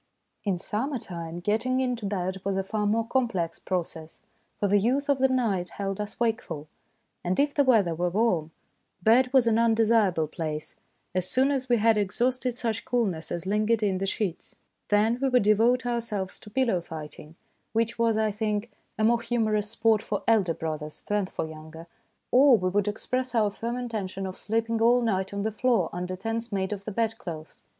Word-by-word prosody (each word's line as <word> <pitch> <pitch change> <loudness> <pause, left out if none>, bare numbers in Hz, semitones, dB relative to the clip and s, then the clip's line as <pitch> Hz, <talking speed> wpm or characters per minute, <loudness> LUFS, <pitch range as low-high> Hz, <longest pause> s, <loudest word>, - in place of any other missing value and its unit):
In 195 -3 +1
summer 255 +10 -2
time 170 -5 -6
getting 225 +7 +1
into 245 -5 -1
bed 190 -1 -2
was 195 -1 -1
a 195 - 0
far 210 +1 -1
more 225 +2 +1
complex 225 -10 -1
process, 165 -3 -4 0.4
for 205 - +2
the 205 +1 +4
youth 265 +7 0
of 280 -2 +3
the 265 - +5
night 220 -9 0
held 195 0 -4
us 210 0 -7
wakeful; 225 -10 -2 0.6
and 180 +1 0
if 285 0 +2
the 285 - +3
weather 220 -10 +4
were 175 +2 0
warm, 180 -5 +1 0.5
bed 250 +4 +5
was 260 -3 +5
an 230 -1 +3
undesirable 225 -7 +3
place 155 -1 -4 0.4
as 185 0 -1
soon 265 +6 +3
as 265 -2 -2
we 240 - +4
had 220 0 +4
exhausted 245 +4 0
such 230 -2 -2
coolness 200 -10 -1
as 175 +1 -3
lingered 215 +3 +1
in 190 -3 +1
the 195 - -1
sheets. 190 -3 -3 0.3
Then 220 +3 +2
we 270 - +2
would 250 -3 +4
devote 230 +5 +3
ourselves 225 -5 -2
to 210 - -12
pillow 230 -6 +1
fighting, 155 -1 -9 0.4
which 230 +1 0
was, 230 -2 +3
I 220 -1 +1
think, 210 +1 -2 0.3
a 215 - 0
more 235 +1 +3
humorous 215 -3 0
sport 225 -1 +2
for 205 -2 -3
elder 195 -8 +3
brothers 155 -1 -5
than 205 -2 0
for - - -4
younger, 160 +1 -10 0.5
or 260 -1 +7
we 185 -2 0
would 205 +2 +1
express 255 +4 -2
our 210 -3 +3
firm 235 +4 -4
intention 210 -6 -4
of 190 0 -6
sleep 225 +1 -1
ing 230 0 -1
all 240 +2 +5
night 190 -4 0
on 200 0 -3
the 220 - -1
floor 220 -5 +1
under 180 +1 -3
tents 225 +4 -4
made 195 0 -1
of 200 -1 -7
the 215 - -4
bedclothes. 210 -8 -4
215 Hz, 190 wpm, -27 LUFS, 185-235 Hz, 0.6 s, or